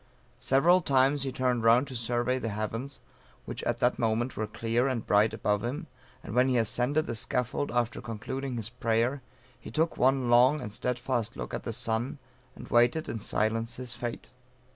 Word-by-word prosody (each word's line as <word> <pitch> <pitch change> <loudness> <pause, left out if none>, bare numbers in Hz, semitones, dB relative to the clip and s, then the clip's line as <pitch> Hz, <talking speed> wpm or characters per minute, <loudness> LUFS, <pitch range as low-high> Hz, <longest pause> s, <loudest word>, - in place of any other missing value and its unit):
Several 170 +7 +4
times 135 -1 +3
he 135 0 -1
turned 125 -2 0
round 120 +4 +5
to 130 - -7
survey 120 +2 0
the 115 - -3
heavens 115 +6 -4 0.4
which - - -5
at 120 - 0
that 125 - +2
moment 115 +2 0
were 110 - -2
clear 115 +4 0
and 130 -4 -2
bright 105 +1 +4
above 105 0 -1
him 145 +9 -3 0.4
and - - -7
when 125 +2 +4
he 130 -2 +2
ascended 125 +7 +1
the - - -3
scaffold 125 +4 -1
after 120 0 -1
concluding 125 +4 -5
his 115 -1 -3
prayer, 120 +3 0 0.4
he - - -10
took 160 +1 0
one 130 0 +3
long 125 +5 +5
and 105 - -6
steadfast 120 0 -2
look - - -6
at - - -4
the - - -2
sun, 115 +5 -1 0.4
and - - -11
waited 120 +7 +3
in 115 - -4
silence 115 +3 -1
his 125 -2 -5
fate. 120 0 -6
120 Hz, 185 wpm, -29 LUFS, 115-130 Hz, 0.4 s, round